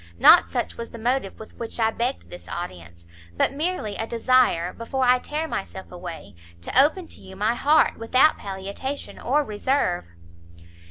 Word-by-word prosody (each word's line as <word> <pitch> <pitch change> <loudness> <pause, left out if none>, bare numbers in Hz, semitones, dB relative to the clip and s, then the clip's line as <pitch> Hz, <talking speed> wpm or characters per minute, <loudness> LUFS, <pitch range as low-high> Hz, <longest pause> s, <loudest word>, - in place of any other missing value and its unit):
Not - - +7
such - - -3
was 230 0 -6
the - - -10
motive 235 -3 -1
with 220 - -11
which 230 0 -5
I 225 -1 +3
begged 245 +4 -3
this 175 - -10
audience; 85 - -7 0.3
but - - +2
merely 295 - -2
a 225 - -2
desire, 235 -7 +2
before 260 +3 -3
I 250 0 +5
tear 305 +5 -3
myself 190 -7 -6
away, 175 - -8 0.3
to 255 - +4
open 330 +4 -1
to - - -9
you 190 - -12
my 210 +4 +1
heart, 295 +5 +3
without 255 +7 +3
palliation 200 +8 -6
or 290 +5 +1
reserve." 210 - -1
230 Hz, 165 wpm, -24 LUFS, 190-270 Hz, 0.3 s, Not